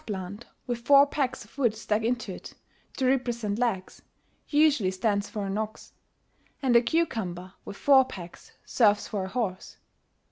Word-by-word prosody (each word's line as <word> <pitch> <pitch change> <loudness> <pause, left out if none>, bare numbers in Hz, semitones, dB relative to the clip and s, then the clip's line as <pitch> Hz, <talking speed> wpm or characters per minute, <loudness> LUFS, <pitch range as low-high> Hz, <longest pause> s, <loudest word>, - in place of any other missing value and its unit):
[*An - - -26
eggplant, 200 +2 -6 0.2
with 240 -1 -3
four 280 +4 +6
pegs 270 -3 -2
of - - -23
wood 235 -5 +2
stuck 215 0 -1
into 235 -3 -2
it, - - -11 0.4
to 265 - 0
represent 235 -5 0
legs, 215 -7 -2 0.5
usually 290 -9 +3
stands 200 +2 -1
for 210 -2 -4
an 195 +2 -2
ox; 220 0 -6 0.7
and 260 -3 +1
a 235 - +8
cucumber, 210 - -2
with 200 - -8
four 270 -2 +6
pegs, 180 -9 -11
serves 210 -4 +3
for 200 -3 -3
a - - -6
horse.... 195 -5 -4
225 Hz, 165 wpm, -27 LUFS, 200-255 Hz, 0.7 s, a